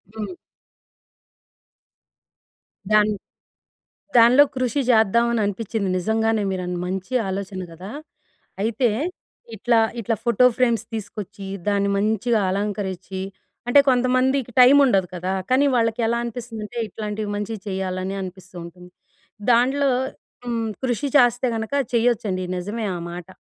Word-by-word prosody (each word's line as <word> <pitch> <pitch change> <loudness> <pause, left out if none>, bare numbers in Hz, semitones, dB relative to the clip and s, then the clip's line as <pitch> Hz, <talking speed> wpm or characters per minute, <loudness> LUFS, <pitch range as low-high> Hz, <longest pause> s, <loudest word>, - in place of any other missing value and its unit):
హ్మ్. 220 +10 -5 2.6
దాని 215 0 +4 1.0
దానిలో 240 +5 +7
కృషి 255 +2 0
చేద్దామని 235 +1 +3
అనిపించింది. 205 0 -2
నిజంగానే 220 +3 +1
మీరు 185 -1 -3
అన్ 180 0 -3
మంచి 190 +6 -4
ఆలోచన 190 0 -4
గదా. 180 +5 -9 0.7
అయితే 230 +3 +1 0.7
ఇట్లా, 235 +2 +2 0.2
ఇట్లా 225 +1 -1
ఫోటో 235 +1 +3
ఫ్రేమ్స్ 235 -4 +2
తీసుకొచ్చి 205 -2 -6 0.2
దాన్ని 200 -1 +1
మంచిగ 220 +3 +1
అలంకరించి, 195 -2 -3 0.5
అంటే 280 +4 +7
కొంతమందికి 255 0 +2
టైం 255 +3 +8
ఉండదు 195 -7 +2
కదా. 180 +1 -3 0.2
కానీ 265 +3 +4
వాళ్ళకి 230 0 +1
ఎలా 235 +1 +1
అనిపిస్తుందంటే 235 -1 -6
ఇట్లాంటివి 210 0 -4
మంచివి 210 +1 -4
చేయాలని 190 0 -3
అనిపిస్తూ 185 0 -10
ఉంటుంది. 180 +1 -12 0.6
దాంన్లో, 265 +4 +3 0.6
హ్మ్, 230 -2 -1 0.2
కృషి 255 +3 -1
చేస్తే 245 -1 +4
గనక 220 +3 -4 0.2
చేయొచ్చండి, 220 -6 +1
నిజమే 205 +5 -4
ఆ - - -5
మాట. 175 0 -8
220 Hz, 115 wpm, -22 LUFS, 195-240 Hz, 2.6 s, టైం